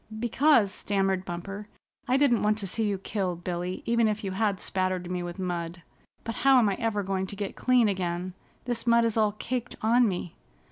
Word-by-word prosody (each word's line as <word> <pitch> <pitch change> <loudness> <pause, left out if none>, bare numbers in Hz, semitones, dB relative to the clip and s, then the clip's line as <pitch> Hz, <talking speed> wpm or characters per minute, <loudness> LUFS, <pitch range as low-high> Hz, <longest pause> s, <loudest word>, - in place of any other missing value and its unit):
"Because," 240 -2 +3
stammered 195 -2 -1
Bumper, 195 +4 -6 0.4
"I 255 +1 +3
didn't 275 -5 +3
want 210 0 +2
to 210 - -4
see 220 +4 -1
you 200 -1 0
killed, 185 -3 -3
Billy, 180 +1 -3
even 235 -1 +3
if 215 +1 -2
you 195 - -2
had 200 0 0
spattered 185 -1 -1
me 180 -1 -2
with 175 +1 -6
mud. 175 -2 -4 0.4
But 230 - -5
how 270 0 +5
am 225 -5 +4
I 195 - 0
ever 225 -3 0
going 190 0 -2
to 200 - -7
get 200 -1 -4
clean 250 -3 +3
again? 180 -2 -2 0.3
This 240 0 -3
mud 235 0 +5
is 230 - 0
all 215 -2 +2
caked 245 +3 -4
on 235 +2 +4
me." 180 -3 -4
200 Hz, 200 wpm, -27 LUFS, 185-230 Hz, 0.4 s, how